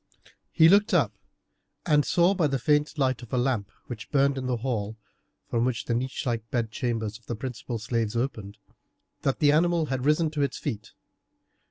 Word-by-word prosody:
He 160 - +6
looked 200 +4 +5
up, - - +2 0.7
and 150 -3 +4
saw 175 +5 +3
by 175 -5 +2
the 135 -1 0
faint 150 +3 +1
light 130 -3 +1
of 120 - -12
a 125 - 0
lamp 120 -5 0 0.2
which 120 -2 -8
burned 140 -1 +3
in 130 -1 -4
the 125 -1 0
hall, 110 -3 -3 0.5
from 115 -1 0
which 125 -3 -1
the 120 - -1
niche 130 +3 -2
like 115 -2 -2
bed 115 -3 -1
chambers 115 -2 -3
of 115 - -31
the 120 - -3
principal 120 0 -5
slaves 115 0 -2
opened, 110 -5 -3 0.6
that 135 - 0
the 145 -2 +4
animal 170 +1 +3
had 130 -1 -2
risen 150 +2 +2
to 150 -2 -2
its 140 - -1
feet. 115 -8 -5
130 Hz, 190 wpm, -26 LUFS, 115-150 Hz, 0.7 s, He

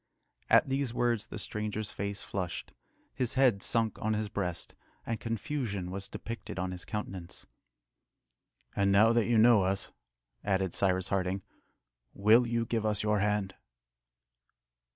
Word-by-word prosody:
At - - +6
these 135 -3 -1
words 120 -3 +1
the - - -7
stranger's 105 0 -4
face 100 0 -4
flushed, 90 -4 -4 0.4
his 130 -1 -1
head 125 -7 +4
sunk 115 -1 0
on 110 0 +1
his 105 -1 -2
breast, 90 -5 -4 0.3
and 115 -1 -2
confusion 115 -5 -3
was 95 +1 -4
depicted 115 0 -7
on 95 0 -2
his 90 -1 -7
countenance. 95 -4 -6 1.3
"And 100 0 +2
now 110 +4 +6
that 115 -2 +2
you 120 -1 +3
know 115 -1 +7
us," 95 +1 -1 0.5
added 95 -3 0
Cyrus 95 -1 +1
Harding, 95 0 -1 0.7
"will 110 +5 +5
you 115 0 0
give 115 -1 -1
us 105 -1 0
your 105 -1 +2
hand?" 105 -1 0
105 Hz, 140 wpm, -31 LUFS, 95-115 Hz, 1.3 s, know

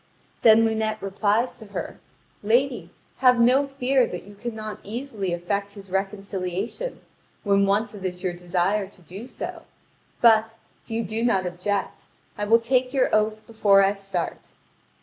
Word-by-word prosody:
Then 225 0 +7
Lunete 220 -1 0
replies 205 +4 0
to 220 - -11
her: 200 - -6 0.4
"Lady, 235 -4 +1 0.3
have 250 -2 +5
no 255 +4 +4
fear 270 -1 +2
that 180 - -6
you 205 - -13
cannot 215 0 -6
easily 215 -3 -4
effect 200 +4 -2
his 195 -2 -12
reconciliation, 195 - -3 0.4
when 200 -1 +3
once 210 +4 +1
it 200 -2 -9
is 180 -1 -4
your 180 -2 -1
desire 180 +3 0
to 190 -1 -20
do 195 +9 -9
so; - - -6 0.6
but, 225 -1 +5 0.3
if - - -28
you 230 0 -1
do 220 +3 -3
not 195 -6 +2
object, 180 +3 -3 0.3
I 205 - -2
will 225 +2 +6
take 250 +2 +1
your 260 - +2
oath 215 0 +1
before 205 -3 +4
I 195 +1 +3
start." 195 -1 -5
210 Hz, 155 wpm, -24 LUFS, 195-230 Hz, 0.6 s, Then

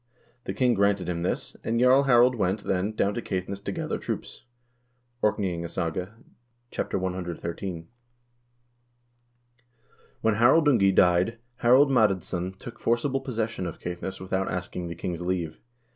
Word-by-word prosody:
The - - -4
king 125 -2 +3
granted 100 -3 +2
him 85 -1 -2
this, 90 - -2
and 115 +1 0
Jarl 130 +3 +5
Harald 125 -1 +5
went, 100 -2 -1
then, 95 +2 0
down 105 -1 +1
to 120 - -3
Caith 95 -4 -3
ness 100 0 -5
to - - -5
gather - - -3
troops." - - -6 0.8
("Orkneyingasaga," 90 -2 -1 0.6
ch. - - -13
cxiii.) 90 -1 -3 2.4
When 110 - +3
Harald 130 +9 +5
Ungi 110 -9 +5
died, 90 +6 +4 0.2
Harald 130 +4 +5
Madadsson 95 -5 +1
took 120 - -10
forcible 130 +4 0
possession 115 -6 -3
of 85 - -6
Caithness 90 +2 -5
without 95 +1 -2
asking 90 -1 -4
the 85 - -6
king's 85 0 -4
leave. 90 -3 -2
95 Hz, 135 wpm, -26 LUFS, 90-115 Hz, 2.4 s, Jarl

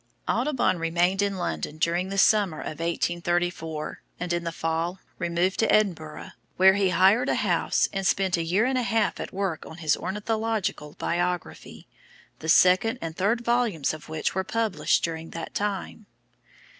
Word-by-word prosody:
Audubon 245 - +1
remained 175 +4 +1
in 200 -1 0
London 85 - -3
during 170 +4 0
the 195 - -4
summer 200 -5 +3
of 155 - -6
1834, 170 -2 -2 0.2
and 175 -1 -2
in 175 0 -1
the 170 - -2
fall 165 +3 -2 0.2
removed 175 +1 0
to 225 - +3
Edinburgh, 160 - 0 0.3
where 190 +1 +7
he 195 -1 +2
hired 195 +8 +4
a - - +2
house - - +1
and 195 -1 -1
spent 190 -2 +2
a 170 - -1
year 185 +7 +2
and 260 0 +1
a - - +1
half 225 -3 0
at - - -5
work 190 -4 -2
on 160 - -10
his 155 -3 +1
"Ornithological 210 -6 -2
Biography," 175 0 -3 0.5
the 160 - -5
second 185 +6 +5
and 165 -1 -5
third 210 +6 +1
volumes 235 - +1
of 155 0 -10
which 160 -1 -2
were 190 - -1
published 225 0 0
during 165 -1 -3
that 165 - -7
time. 205 +1 -3
180 Hz, 165 wpm, -26 LUFS, 165-205 Hz, 0.5 s, where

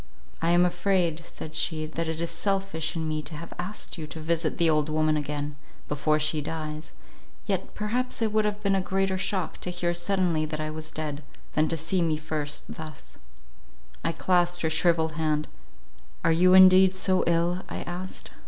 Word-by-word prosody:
"I 165 - +2
am 175 +1 +5
afraid," 175 -2 +1
said 155 - -8
she, 155 0 -1
"that 160 +1 -3
it 160 0 -3
is 170 0 -2
selfish 195 -6 -1
in 160 -1 -2
me 155 0 -1
to 155 0 -7
have 170 +2 -8
asked 185 0 -4
you 155 - -5
to 160 - -8
visit 160 0 0
the 170 -2 +3
old 155 -1 +2
woman 155 0 +2
again, 145 0 -3 0.3
before 150 +1 +1
she 155 0 +1
dies: 155 0 -5 0.5
yet - - -2
perhaps 240 +4 -2
it 220 -2 0
would 215 0 +3
have 210 0 -2
been 200 -1 +2
a 195 - +2
greater 190 0 0
shock 190 -3 -1
to - - -4
hear 175 -1 -1
suddenly 175 -2 +1
that 155 0 -4
I 155 0 -2
was 155 0 -5
dead, 150 -2 -4 0.3
than 155 +1 +3
to 165 - -1
see 170 +4 0
me 160 -2 +1
first 150 -1 -3
thus." 155 -3 -10 0.8
I 165 - +1
clasped 175 +1 +1
her 160 - +1
shrivelled 160 0 +3
hand: 155 -1 0 0.8
"Are 165 - +4
you 180 +3 +5
indeed 190 0 +8
so 185 0 +3
ill?" 170 +2 +2
I - - -4
asked. 180 +2 -6
165 Hz, 190 wpm, -27 LUFS, 155-185 Hz, 0.8 s, indeed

